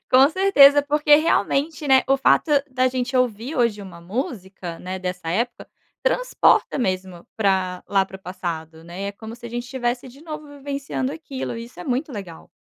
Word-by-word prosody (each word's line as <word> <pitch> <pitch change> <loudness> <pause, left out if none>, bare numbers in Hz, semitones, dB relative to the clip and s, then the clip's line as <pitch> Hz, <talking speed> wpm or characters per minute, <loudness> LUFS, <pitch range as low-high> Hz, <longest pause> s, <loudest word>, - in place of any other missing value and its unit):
com 265 +2 +7
certeza, 290 -7 +6
porque 295 0 +4
realmente, 305 0 +1
né, 265 -1 +6
o 270 - +4
fato 275 +3 +3 0.2
da 255 0 +2
gente 255 0 -1
ouvir 250 +2 0
hoje 235 -5 +1
uma 175 -3 -11
música, 190 -4 -5
né, 185 +1 -5
dessa 180 -2 -5
época, 235 +6 -2 0.3
transporta - - +2
mesmo, 185 -5 -3
para 190 -3 0
lá 195 -1 +2
para 190 - -10
o - - -19
passado, 165 -3 -6
né, 175 +4 -7
é - - -5
como 220 +2 -9
se 240 0 -16
a - - -7
gente 240 0 -4
estivesse, 250 0 -3
de 275 +5 -15
novo 305 -2 -7
vivenciando 280 -2 -4
aquilo, 285 -6 -6
e 230 - -6
isso 235 -7 -13
é - - -7
muito 265 +4 -2
legal. 190 -7 -9
240 Hz, 185 wpm, -22 LUFS, 190-275 Hz, 0.3 s, com